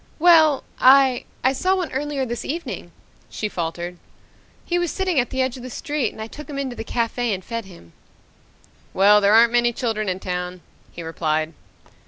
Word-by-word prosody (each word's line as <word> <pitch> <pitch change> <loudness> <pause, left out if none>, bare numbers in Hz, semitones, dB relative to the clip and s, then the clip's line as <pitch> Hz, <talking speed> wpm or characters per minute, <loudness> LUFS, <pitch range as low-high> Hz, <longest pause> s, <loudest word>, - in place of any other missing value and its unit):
"Well 320 -4 +5 0.2
I 265 -1 +5 0.2
I 260 +1 +3
saw 370 +7 +1
one 360 -4 -3
earlier 280 0 -2
this 240 -1 -4
evening," 335 +4 -5 0.4
she 215 - -3
faltered. 175 -1 -4 0.7
"He 350 0 0
was 350 -1 0
sitting 370 -5 0
at 245 - 0
the 260 0 0
edge 260 0 -3
of - - -10
the 255 - -7
street 290 -2 -2
and - - -15
I 220 - -4
took 300 +7 -11
him 285 - -5
into 265 -3 -3
the 225 - -5
cafe 235 +1 -1
and 185 - -10
fed 230 -2 -4
him." 170 - -15 1.0
"Well, 205 +2 +6
there 200 +1 +5
aren't 230 +1 +6
many 240 0 +3
children 220 -4 -2
in 185 0 -2
town," 180 -1 -4 0.3
he 170 - -8
replied. 155 -1 -1
240 Hz, 190 wpm, -22 LUFS, 190-275 Hz, 1.0 s, Well